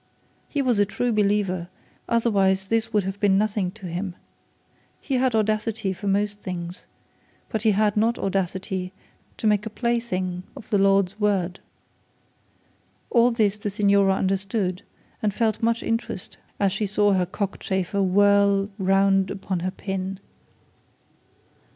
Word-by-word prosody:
He 285 -2 0
was 245 -5 +2
a 205 - +5
true 240 +4 -1
believer, 200 -4 +1 0.4
otherwise 195 -5 +2
this 225 0 0
would 210 -2 +2
have 195 +2 -4
been 200 -2 +3
nothing 205 -2 0
to 205 -3 -11
him. 180 +1 -4 0.8
He 270 -3 -1
had 255 -2 +2
audacity 215 -1 0
for 195 +3 -7
most 205 +1 0
things, 175 -1 -6 0.6
but 220 - -2
he 220 - +3
had 210 +1 +2
not 225 +2 +2
audacity 190 -1 -2 0.4
to - - -5
make 210 0 +2
a - - -3
plaything 210 -6 -2 0.2
of - - -12
the 205 - +3
Lord's 195 0 +3
word. 195 -3 0 1.5
All 240 -1 +5
this 215 -4 +1
the 205 - -2
signora 200 -1 +3
understood, 190 -1 -1 0.4
and 210 - +1
felt 220 -3 0
much 230 0 +1
interest 230 -5 -3 0.2
as 200 -1 +2
she 205 +2 -1
saw 205 0 +3
her 185 -2 +1
cockchafer 190 0 -2
whirl 200 +1 +3
round 195 0 +3
upon 190 -2 -3
her 180 +2 -1
pin. 190 0 -4
200 Hz, 140 wpm, -24 LUFS, 190-215 Hz, 1.5 s, a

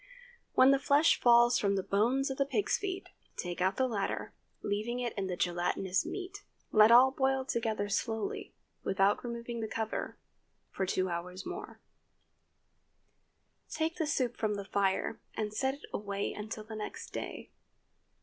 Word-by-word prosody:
When 260 +1 +7
the 275 - +4
flesh 285 +4 +4
falls 240 0 +6
from 200 -1 +1
the 190 - -1
bones 245 +9 +1
of 265 - -5
the 275 - +3
pig's 405 +8 +1
feet, 385 -1 -4 0.3
take 175 0 -4
out 190 +1 +2
the 260 - +3
latter, 205 -5 -2 0.3
leaving 215 +4 -1
in 225 -6 -2
the 180 - -2
gelatinous 180 +2 0
meat. 395 +1 -6 0.3
Let 215 0 +7
all 250 +3 +8
boil 265 0 +1
together 220 -5 -1
slowly, 220 +1 -2 0.3
without 195 +1 +2
removing 235 0 -5
the 220 - -2
cover, 220 0 -3 0.5
for 190 - -2
two 185 0 +1
hours 180 +2 -5
more; - - -7 1.9
take 320 +1 -2
the 320 -3 0
soup 255 -4 0
from 215 -2 0
the 200 -1 -5
fire 200 +2 0
and 215 -1 -2
set 265 +4 0
it 285 - -12
away 200 -1 -2
until 215 +1 -6
the 220 +1 -8
next 215 - -6
day. - - -6
220 Hz, 155 wpm, -32 LUFS, 200-265 Hz, 1.9 s, all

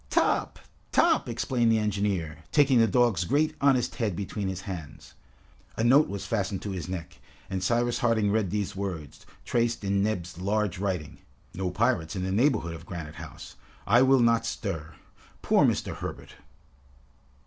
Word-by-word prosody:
"Top, - - +1 0.3
Top!" - - +3
exclaimed 120 -3 +1
the 110 - +4
engineer, 100 -7 -1
taking 140 -4 +4
the 115 - +5
dog's 110 -3 +2
great 145 - +1
honest 135 -3 +2
head 105 -6 -1
between 100 +1 -4
his 95 -1 -4
hands. 85 -7 -8 0.6
A 110 - 0
note 135 +6 +5
was 100 -1 -5
fastened 100 -3 -2
to 100 - -4
his 90 -2 -5
neck, 90 -4 -6 0.3
and 95 -1 -2
Cyrus 120 +4 +1
Harding 110 -4 +2
read 105 -3 +1
these 100 0 -2
words, 90 -7 -6 0.2
traced 115 -2 0
in 100 0 +1
Neb's 90 -5 -2
large 100 -1 -1
writing: 95 -6 -3 0.3
"No 95 0 -2
pirates 105 -3 0
in 95 - -2
the 95 - -2
neighborhood 105 - +2
of 80 - -10
Granite 80 -4 -7
House. - - -10 0.3
I 120 +5 +5
will 130 -1 +5
not 115 -1 +3
stir. 80 -9 -4 0.5
Poor - - +4
Mr. - - -1
Herbert!" - - -7
100 Hz, 160 wpm, -27 LUFS, 90-115 Hz, 0.6 s, the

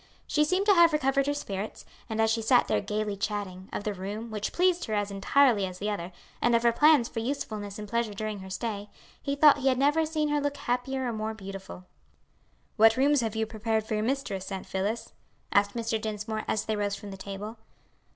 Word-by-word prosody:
She 300 - +2
seemed 370 +6 +1
to 410 - +6
have 340 -3 +6
recovered 275 -2 +2
her 290 - +2
spirits, 200 -6 -5 0.2
and 220 0 -3
as 220 0 +3
she 225 0 0
sat 245 +3 +4
there - - +1
gayly 210 0 -2
chatting 195 -2 -4
of - - -4
the 210 - -2
room, 205 +4 -6
which 210 -1 -3
pleased 360 0 +2
her 215 - -2
as 205 -1 -1
entirely 220 +2 +3
as 180 -1 -8
the 210 +2 -2
other, 185 -3 -4 0.3
and 240 0 +4
of 230 - +2
her 235 - +5
plans 295 0 +5
for 230 - -5
usefulness 215 -5 -4
and 210 0 -6
pleasure 230 -1 -1
during 215 0 -4
her 190 0 -9
stay, 205 +1 -4 0.3
he 280 - -2
thought 290 0 +6
he 270 - 0
had 260 -1 +3
never 295 +4 +3
seen 305 -1 0
her 295 0 +1
look 285 0 -2
happier 255 +2 -2
or 235 - -2
more 220 0 -3
beautiful. 195 -2 -9 0.9
"What 225 +2 +6
rooms 285 +1 +4
have 225 -2 -2
you 220 0 0
prepared 220 0 -1
for 220 - -4
your 210 - +1
mistress, 215 -6 -2
Aunt 190 -1 -4
Phillis?" 215 +4 -3 0.4
asked 200 +1 +3
Mr. 230 -2 -1
Dinsmore, 215 0 -3
as 215 - 0
they 220 - -1
rose 205 -1 -1
from 200 0 -9
the - - -6
table. 200 +3 -7
220 Hz, 220 wpm, -28 LUFS, 205-265 Hz, 0.9 s, to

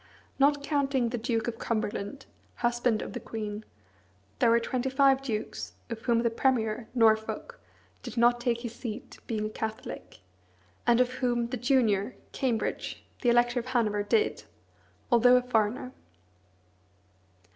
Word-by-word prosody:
Not 285 +1 +4
counting 275 -5 +1
the 240 0 -3
Duke 230 0 -1
of 230 -1 -4
Cumberland, 215 +2 -3 0.3
husband 240 -2 +1
of - - -7
the - - -4
queen, 215 -1 -5 0.8
there - - +4
were 230 0 +5
twenty 255 +2 -2
five 270 0 +4
dukes, 225 -5 -4 0.2
of 225 -1 -4
whom 235 -1 +2
the 235 - +2
premier, 230 -2 0
Norfolk, 220 -2 +2 0.4
did - - -8
not 240 +1 +4
take 240 -1 0
his 235 -2 -5
seat, 235 0 -7
being 215 -2 -1
a - - -2
Catholic; 220 0 -6 0.7
and 240 0 +5
of 250 0 +3
whom 240 -2 0
the 255 - -2
junior, 245 -4 +2 0.2
Cambridge, 245 -5 -2 0.2
the 245 - +3
Elector 240 +1 +3
of 240 - -7
Hanover, 220 -5 +1
did, 430 - +1 0.7
although 245 +1 +6
a 250 - +4
foreigner. 240 +1 0
240 Hz, 145 wpm, -29 LUFS, 220-255 Hz, 0.8 s, although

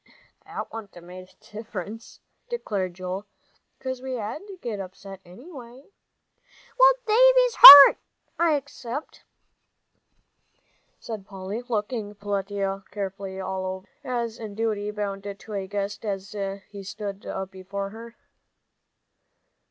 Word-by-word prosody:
"That - - -7
wouldn't 220 -3 -9
'a' - - -11
made 180 +1 -12
any - - -24
difference," 215 0 -9 0.3
declared 200 - -4
Joel, 185 +2 -6 0.5
"'cause 260 -1 -6
we 260 0 -5
had 220 +4 -5
to 390 -2 -11
get 225 -8 -5
upset, 195 0 -10
anyway." 250 - -14 0.9
"Well, - - +7
Davie's - - +4
hurt, 285 - +13 0.4
I 335 -2 +3
expect," 280 -1 -7 1.7
said 215 -4 -8
Polly, 195 +3 -6
looking 210 -2 -3
Peletiah 200 -1 -3
carefully 195 -1 -6
all 190 0 -4
over, 185 0 -6 0.2
as 235 -3 -4
in 215 -3 -8
duty 215 -2 -2
bound 205 -2 -4 0.2
to 215 - -11
a 195 -1 -4
guest, 205 +1 -5
as 195 -2 -5 0.4
he 200 -1 -10
stood 200 0 -7
up 190 0 -5
before 195 +1 -6
her. 230 +2 -11
205 Hz, 120 wpm, -24 LUFS, 195-235 Hz, 1.7 s, hurt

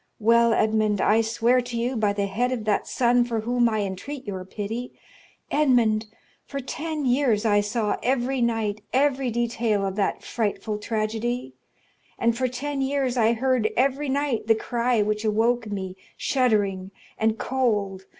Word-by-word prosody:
Well, 235 +1 +4
Edmond, 215 -2 +2
I 220 +3 +4
swear 230 +3 +2
to 245 -1 -5
you, 245 +3 -1
by 215 -3 +2
the 200 0 -1
head 230 +6 -1
of 235 -4 -3
that 210 -1 0
son 245 0 +3
for 230 -2 -2
whom 240 +1 +2
I 215 -1 0
entreat 250 +9 -5
your 190 -3 -5
pity,—Edmond, 225 +2 -1 0.4
for 275 - -6
ten 305 +2 -4
years 245 -4 +2
I 205 -1 +4
saw 210 +1 -1
every 255 +1 0
night 220 -3 0
every 270 -1 +2
detail 230 -3 0
of 190 -1 -3
that 200 - -1
frightful 215 -1 -2
tragedy, 220 - -2 0.6
and 235 0 +1
for 255 +1 0
ten 275 +3 -3
years 270 -2 0
I 230 -1 +3
heard 250 -2 +1
every 275 +3 +1
night 270 -5 -1
the 225 - +5
cry 235 0 0
which 210 +1 -1
awoke 225 +1 +1
me, 190 -2 -4 0.2
shuddering 205 -8 +1 0.3
and 220 0 +1
cold. 205 -8 -1
230 Hz, 155 wpm, -25 LUFS, 215-250 Hz, 0.6 s, the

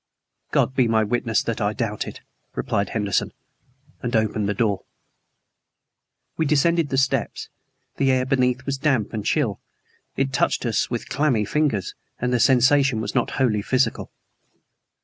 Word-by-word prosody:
"God - - +1
be 130 -3 +3
my 110 -1 +3
witness 115 0 0
that 115 -2 -3
I 105 +1 +1
doubt 110 -3 -3
it," - - -9 0.3
replied 100 -1 -1
Henderson, 105 -4 -1 0.7
and 120 0 -2
opened 110 -2 +1
the 105 - -1
door. 105 -5 0 1.6
We 160 - +1
descended 160 +2 +2
the 135 - -1
steps. 135 0 0 0.5
The 135 -1 +3
air 130 -1 +2
beneath 125 -1 +1
was 140 -1 -2
damp 130 -8 +1
and 110 -2 -3
chill. 115 - 0 0.6
It 135 0 0
touched - - +1
us 115 -3 +1
as - - -18
with 120 -2 -4
clammy 135 -8 +1
fingers; 135 - 0 0.3
and 125 +1 -1
the 125 - +2
sensation 135 0 +4
was 105 -1 -3
not - - +1
wholly 115 -6 +2
physical. 130 +5 0
125 Hz, 155 wpm, -23 LUFS, 110-135 Hz, 1.6 s, sensation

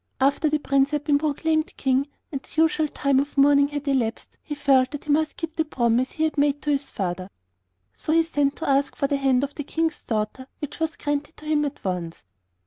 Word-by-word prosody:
After 280 +3 +2
the 305 - +2
Prince 275 -1 +2
had 295 -1 -2
been 290 -1 +3
proclaimed 315 +1 0
King, 265 +1 +1 0.2
and 275 -3 -3
the 315 +3 +1
usual 315 -1 +2
time 280 -2 +1
of 285 +1 -3
mourning 280 0 +6
had 290 0 -5
elapsed, 250 -5 -1
he 295 - -5
felt 275 -3 +3
that 290 -1 -7
he 300 - -2
must 310 +1 +1
keep 330 -1 -5
the 320 - +1
promise 250 -3 +1
he 315 - -1
had 315 -2 0
made 290 0 +2
to 295 - +1
his 280 -1 0
father, 185 -1 -3 0.6
so - - -3
he 330 +1 +5
sent 290 -3 0
to 325 - -5
ask 275 0 +2
for - - 0
the 280 0 +1
hand 270 -1 +2
of 285 0 -3
the 295 - -5
King's 325 +2 -2
daughter, 220 +4 -3
which 295 +1 -6
was 320 -1 -1
granted 290 +2 -3
to 305 - -13
him 305 -1 +2
at 285 - -6
once. 175 -3 -3
285 Hz, 225 wpm, -24 LUFS, 270-305 Hz, 0.6 s, mourning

